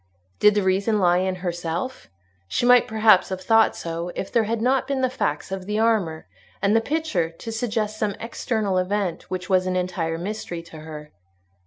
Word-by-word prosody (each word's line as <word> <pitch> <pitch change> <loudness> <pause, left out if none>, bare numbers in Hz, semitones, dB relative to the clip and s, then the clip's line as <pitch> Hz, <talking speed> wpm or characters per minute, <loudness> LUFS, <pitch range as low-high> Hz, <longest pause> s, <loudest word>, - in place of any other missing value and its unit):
Did 210 0 +5
the 205 - +2
reason 195 +4 +2
lie 180 -2 +3
in 185 0 0
herself? 175 +8 -4 0.4
She 240 - 0
might 245 0 +6
perhaps 220 -3 +4
have 190 -1 -4
thought 225 +3 +4
so, 170 +1 -4
if 195 - -4
there 230 -3 +2
had 225 +1 -1
not 255 +3 +1
been 275 -1 -1
the 255 -1 +1
facts 150 - -2
of 190 -1 -5
the 210 0 -1
armour 215 -8 +1 0.3
and 200 +2 +2
the 225 - +4
picture 285 - -1
to 165 +7 -8
suggest 220 -2 -2
some 205 -2 0
external 220 -4 -1
event 185 -2 -2
which 180 -1 -4
was 185 -1 +2
an 185 - -1
entire 175 -3 -1
mystery 175 -2 -5
to 165 -1 -12
her. 155 -1 -9
195 Hz, 190 wpm, -23 LUFS, 175-225 Hz, 0.4 s, might